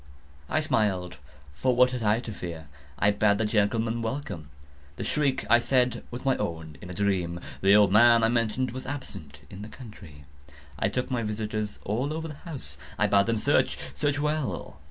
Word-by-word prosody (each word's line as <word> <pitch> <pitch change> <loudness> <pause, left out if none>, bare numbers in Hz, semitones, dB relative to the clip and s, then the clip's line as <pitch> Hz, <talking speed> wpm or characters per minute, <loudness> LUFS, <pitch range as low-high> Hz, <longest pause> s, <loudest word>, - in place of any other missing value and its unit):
I - - +1
smiled,—for 90 - -1
what 125 +1 +5
had 125 -2 -3
I 110 +2 +2
to 115 - -7
fear? 85 -5 -7 0.3
I 105 - +3
bade 100 0 +3
the 110 - 0
gentlemen 115 +2 +1
welcome. 115 - -4 0.5
The - - -5
shriek, 140 -3 0
I 120 - +6
said, 125 0 +1
was 120 +3 -7
my 135 -1 +3
own 80 -2 -4
in 90 - -9
a - - -6
dream. 90 -4 0 0.2
The 100 +1 +6
old 105 -2 +6
man, 115 +2 +6
I - - +5
mentioned, 120 +2 0
was 130 +1 -7
absent 80 - -7
in 95 - -9
the 105 - -7
country. 95 - -12 0.5
I - - +2
took 125 +1 -3
my 125 -2 0
visitors 105 -1 -3
all 125 +9 -1
over 160 +1 -4
the 155 - -7
house. 135 - -8 0.2
I - - +3
bade 100 +1 +3
them 115 -1 +1
search—search 145 +6 +1
well. 150 -1 -2
110 Hz, 180 wpm, -27 LUFS, 95-125 Hz, 0.5 s, I